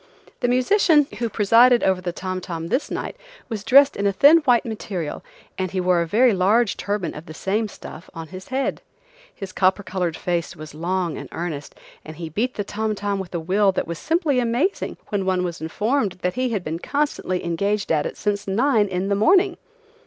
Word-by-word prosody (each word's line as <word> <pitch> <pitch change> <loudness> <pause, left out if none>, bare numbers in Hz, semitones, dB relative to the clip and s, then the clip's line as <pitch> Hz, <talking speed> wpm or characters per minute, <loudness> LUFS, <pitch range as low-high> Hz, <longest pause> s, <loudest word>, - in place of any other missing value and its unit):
The 245 - 0
musician 295 +5 +4
who 235 -1 -1
presided 235 +4 +5
over 190 -1 +2
the 180 -1 -3
tom 185 +1 -4
tom 165 -2 -5
this 260 - 0
night - - -4 0.3
was 215 -4 -4
dressed 275 +4 +6
in 200 - 0
a - - +3
thin 285 +11 +7
white 250 -6 +3
material, 195 -8 -5 0.4
and 185 0 -1
he 185 - -3
wore 180 -1 +2
a 170 - -2
very 230 +6 +4
large 200 +4 +2
turban 200 -5 -3
of 150 - -10
the 155 - -9
same 210 +6 -1
stuff 170 -4 -11
on 165 -2 -8
his 185 +1 -9
head. 265 +1 -2 0.5
His 195 -3 -7
copper 190 +2 +2
colored 180 -4 -2
face 170 -3 -2
was 155 -1 -10
long 175 +1 -2
and - - -9
earnest, 160 -4 -5 0.3
and 155 - -9
he 165 0 -6
beat 235 - -2
the 205 - -2
tom 215 +1 -2
tom 200 -1 -2
with 185 -2 -6
a - - 0
will 195 +4 +2
that - - -1
was 170 0 -6
simply 320 -5 +1
amazing 250 +11 -1
when 205 -2 -1
one 185 -1 0
was 170 -2 -4
informed 210 - 0
that 180 - 0
he 255 0 -1
had 210 -6 -2
been 160 +1 -4
constantly 280 -10 -2
engaged 200 +5 -1
at 150 -2 +2
it - - -8
since 205 -1 -2
nine 220 +1 +2
in 185 0 -2
the 200 - +1
morning. 360 - +4
200 Hz, 205 wpm, -22 LUFS, 180-240 Hz, 0.5 s, thin